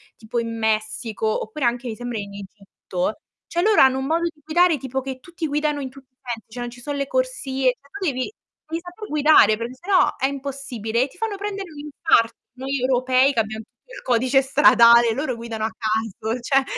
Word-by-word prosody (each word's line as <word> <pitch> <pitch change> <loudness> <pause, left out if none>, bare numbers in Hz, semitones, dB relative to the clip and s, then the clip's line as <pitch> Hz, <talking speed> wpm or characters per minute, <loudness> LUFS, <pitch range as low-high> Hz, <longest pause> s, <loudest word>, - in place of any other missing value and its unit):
tipo 230 +1 -4
in 230 0 -4
Messico 220 0 -1
oppure 245 +5 -3
anche 240 +1 0
mi 220 - -4
sembra 245 -1 -4
in 200 -1 -7
Egitto, 195 -1 -5 0.3
cioè 345 - -1
loro 425 +2 +5
hanno 265 0 +5
un 265 - -3
modo 330 +4 +1
di 320 -3 -4
guidare, 340 0 +3
tipo 265 0 -3
che 265 0 -6
tutti 340 +2 -5
guidano 295 0 0
in 260 - -4
tutti 265 0 -17
i 255 - -52
sensi, 235 -3 -5
cioè 245 +3 -7
non 240 0 -4
ci 245 - -13
sono 290 +3 -4
le 275 -1 -2
corsie, 270 - 0
cioè 280 +3 -26
tu 400 -1 -5
devi 260 +3 -1 0.4
devi 330 +1 -3
saper 360 +5 -9
guidare 295 -8 +5
perché 235 +3 -5
se 350 +9 -13
no 370 - +4
è 265 - 0
impossibile, 265 -4 -2
e - - -1
ti - - -20
fanno 445 -1 -2
prendere 395 -3 -5
un 295 - -11
infarto. 290 -5 +2 0.2
Noi 270 +1 -2
europei 255 +1 +3
che 235 - 0
abbiamo 220 0 -2
tutto - - -27
il - - -9
codice 255 +2 +3
stradale, 235 -4 +6
loro 265 0 -2
guidano 230 -1 -4
a - - 0
caso, 220 0 -2
cioè 270 +3 +3
260 Hz, 215 wpm, -22 LUFS, 230-295 Hz, 0.4 s, stradale